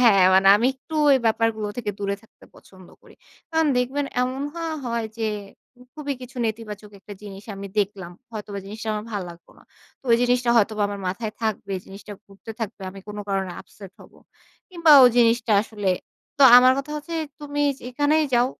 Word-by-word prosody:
হ্যাঁ, 200 -6 +6
মানে 190 +1 +5
আমি 235 +4 +1
একটু 290 +5 -12 0.2
ওই 270 - +6
ব্যাপারগুলো 220 -1 0
থেকে 210 -3 -2
দূরে 200 0 -2
থাকতে 225 - -21
পছন্দ 185 -2 -17
করি। - - -18 0.4
কারণ 320 -1 +2
দেখবেন 265 +4 -1 0.2
এমন 260 +2 -2
হওয়া 330 -1 -3
হয় 235 -1 -2
যে, 220 -1 0 0.7
খুবই 290 -2 -4
কিছু 255 +1 -11
নেতিবাচক 215 -2 -6
একটা 205 - -11
জিনিস 200 -1 -10
আমি 200 0 -7
দেখলাম। 195 -3 -2 0.2
হয়তোবা 205 -2 -6
জিনিসটা 220 +2 -7
আমার 210 +1 -5
ভাল 205 -2 -2
লাগলো 170 0 -16
না। - - -21 0.4
তো - - -46
ওই - - +6
জিনিসটা 245 0 +2
হয়তোবা 215 -1 +2
আমার 200 -1 -6
মাথায় 215 +3 -4
থাকবে, 210 -2 -2
জিনিসটা 200 +2 -10
ঘুরতে 200 +3 -12
থাকবে। 220 -2 -5
আমি 195 - -11
কোনো 210 0 -6
কারণে 195 -2 -2
আপসেট 195 -2 -14
হব। - - -16 0.6
কিংবা 335 -3 +2
ওই 245 - +7
জিনিসটা 230 -1 +3
আসলে, 205 -3 -2 0.5
তো - - +5 0.2
আমার 255 +1 +6
কথা 275 +2 -5
হচ্ছে, 315 +3 -7 0.3
"তুমি 290 0 -3 0.2
যেখানেই 290 +5 +1
যাও। 240 +1 +4
220 Hz, 180 wpm, -23 LUFS, 200-255 Hz, 0.7 s, ওই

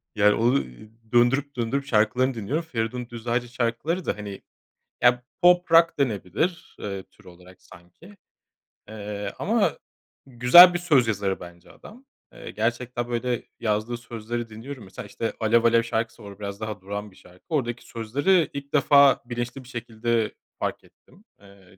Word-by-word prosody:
Yani 105 0 +4
onu 120 +4 +2 0.5
döndürüp, 135 +4 +3
döndürüp 125 +4 -2
şarkılarını 125 +2 +2
dinliyorum. 125 +9 -3
Feridun 120 -3 -3
Düzağaç'ın 120 +1 -2
şarkıları 125 +9 -2
da - - -2
hani, 100 -2 -8 0.6
ya 120 0 +4 0.2
pop 180 -1 +4
rock 165 -1 +5
denebilir, 125 - -2
eee, 100 -2 -5
tür 100 +1 -25
olarak 90 +1 -16
sanki. 130 - -17 0.7
Eee, 105 -1 -6
ama - - +1 0.5
güzel 135 +9 +8
bir 175 - -1
söz 145 -9 +3
yazarı 100 -3 -1
bence 85 -1 -13
adam. 250 +5 -15 0.3
Eee, - - -9
gerçekten 120 +2 -2
böyle 120 0 -2 0.2
yazdığı 110 +2 -1
sözleri 115 0 -6
dinliyorum. 120 +3 -9
Mesela 95 - -9
işte 115 - -4
"Alev 115 +1 +3
Alev" 115 0 +4
şarkısı 110 -2 -3
var, 100 - -9
o 100 - -15
biraz 100 -1 -6
daha 110 -4 -5
durağan 100 +1 -6
bir - - -21
şarkı. 90 0 -20
Oradaki 125 -6 -2
sözleri 145 - +1
ilk 140 +1 -8
defa 140 -2 +5
bilinçli 120 +2 -5
bir 125 - -16
şekilde 115 -2 -2 0.3
fark - - -3
ettim. - - -24 0.2
Eee, 100 -2 -19
120 Hz, 150 wpm, -25 LUFS, 105-135 Hz, 0.7 s, güzel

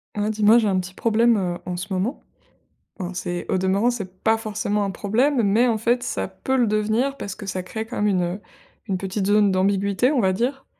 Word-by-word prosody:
Ah, 210 +1 0
dis 215 0 -3
moi, 215 +3 +7
j'ai 225 -3 +2
un 190 -2 +2
petit 185 0 -7
problème, 230 0 +3
heu, 175 -3 -2
en 180 -1 -3
ce 190 +3 -5
moment. 200 +9 -2 0.8
Enfin, 185 -1 -5
c'est, 175 0 -4
au - - +1
demeurant, 195 +6 +2
c'est 190 -5 -7
pas 220 0 +4
forcément 210 -1 -2
un 200 - -2
problème, 235 +9 +1
mais 215 +5 +3
en 225 - +1
fait 240 +3 +1
ça 95 - -3
peut 265 - -2
le 245 -2 +3
devenir 220 +6 0
parce 200 -6 -6
que 205 - -9
ça 185 -1 -3
crée 220 +4 -5
comme 225 -3 -2
une, 190 -3 +2
heu, 175 +3 -3 0.5
une 190 -3 -1
petite 190 +1 -3
zone 205 0 +4
d'ambiguïté, 200 +5 +2
on 285 -4 +2
va 190 -3 +2
dire. 255 +7 -2
205 Hz, 230 wpm, -23 LUFS, 190-230 Hz, 0.8 s, moi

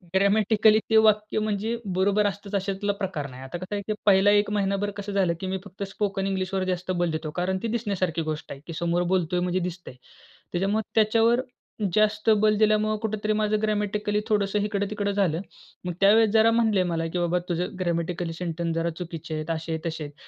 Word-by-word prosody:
Grammatically 215 +2 +4
ते 225 - +5
वाक्य 215 0 +3
म्हणजे 215 +2 -1 0.2
बरोबर 200 +3 +2
असतंच, 200 +1 -5
अशातला 195 +1 -1
प्रकार 185 -8 -4
नाही. 130 0 -11
आता 135 +6 -6
कसं 185 +3 -5
आहे, 200 - -2
की 215 - 0
पहिला 200 0 +5
1 205 0 +3
महिनाभर 200 0 0
कसं 205 0 -5
झालं, 190 -4 +2
की 190 - -4
मी 190 +1 -1
फक्त 200 +1 -7
स्पोकन 195 -1 -2
इंग्लिशवर 190 0 -1
जास्त 185 0 -2
बल 175 -2 0
देतो 155 -1 -4
कारण 190 +1 0
ती 230 - 0
दिसण्यासारखी 200 -7 -1
गोष्ट 155 -1 -4
आहे, 135 - -7
की 165 - -6
समोर 170 +1 +1
बोलतोय 180 -1 +1
म्हणजे 180 +1 0
दिसतंय. 180 -6 -6 0.6
त्याच्यामुळे 195 +5 +1
त्याच्यावर 225 +3 +4 0.5
जास्त 215 +1 +2
बल 215 0 +4
दिल्यामुळं 215 0 +2
कुठेतरी 215 -1 -1
माझं 215 0 +1
ग्रॅमॅटिकली 210 -1 0
थोडंसं 205 -2 +1
इकडं-तिकडं 205 0 -1
झालं. 190 -5 +1 0.5
मग 180 - -2
त्यावेळेस 215 +2 +6
जरा 225 +1 +5
म्हणले 220 -5 +3
मला, 165 -2 -1
की 175 +2 -3
बाबा 175 +1 +1
तुझं 175 +2 -2
ग्रॅमॅटिकली 170 -1 -2
सेंटन्स 165 -1 -3
जरा 165 +1 0
चुकीचे 165 -3 -6
आहेत, 155 +1 -5
असे-तसे 160 0 -3
आहेत. 145 -1 -8
195 Hz, 185 wpm, -25 LUFS, 175-210 Hz, 0.6 s, त्यावेळेस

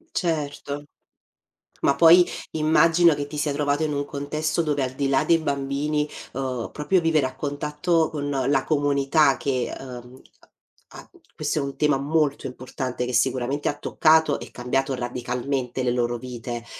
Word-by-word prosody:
Certo, 145 -4 -2 1.0
ma 140 - +3
poi 170 +2 +7 0.3
immagino 165 +2 +4
che 145 - -3
ti 150 +1 -8
sia 145 -1 0
trovato 145 +1 0
in 150 -1 -1
un 145 0 -1
contesto 155 +3 -2
dove 150 -4 0
al 130 - -2
di 140 0 0
là 135 0 +2
dei 165 - +4
bambini, 145 0 -1 0.3
ehm, 130 -3 -3
proprio 150 +6 +1
vivere 160 -4 +2
a 130 0 -5
contatto 150 +3 0
con 145 -2 -4
la 135 -1 +1
comunità 145 -1 +2
che, 130 -3 -1
ehm, 125 -1 -10 0.7
ha - - -13 0.3
questo - - -1
è - - 0
un 140 0 -5
tema 150 -2 +3
molto 145 +1 0
importante 130 0 -5
che 125 - -4
sicuramente 130 +3 0
ha 145 - -4
toccato 160 +2 +3
e - - -9
cambiato 135 +2 -1
radicalmente 125 +1 -3
le 125 - +1
loro 120 -1 0
vite, 120 -1 -6
140 Hz, 155 wpm, -24 LUFS, 130-150 Hz, 1.0 s, poi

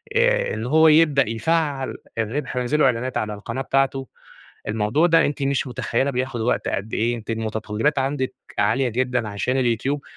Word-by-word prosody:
آآ - - +2
إن 110 +1 -4
هو 160 +5 +5
يبدأ 150 -6 +4
يفعّل 140 +3 -1 0.2
الرِبح 125 +5 -2
وينزل 125 +5 0
له - - +5
إعلانات 125 0 0
على 105 -1 -2
القناة 115 +5 -5
بتاعته، 135 0 0 0.6
الموضوع 110 +10 +2
ده 165 -1 +4
أنتِ 145 -1 -2
مش 135 0 0
مُتخيّلة 125 +2 -1
بياخُد 125 -2 -2
وقت 120 - 0
قد 100 +3 -3
إيه، 120 +2 +1
أنتِ 115 - -12
المُتطلِّّبات 110 +5 -1
عندِك 135 -1 -2 0.2
عالية 115 +6 +2
جدًا 125 -1 -1
عشان 105 +6 -1
اليوتيوب 130 +3 0
130 Hz, 165 wpm, -22 LUFS, 115-140 Hz, 0.6 s, هو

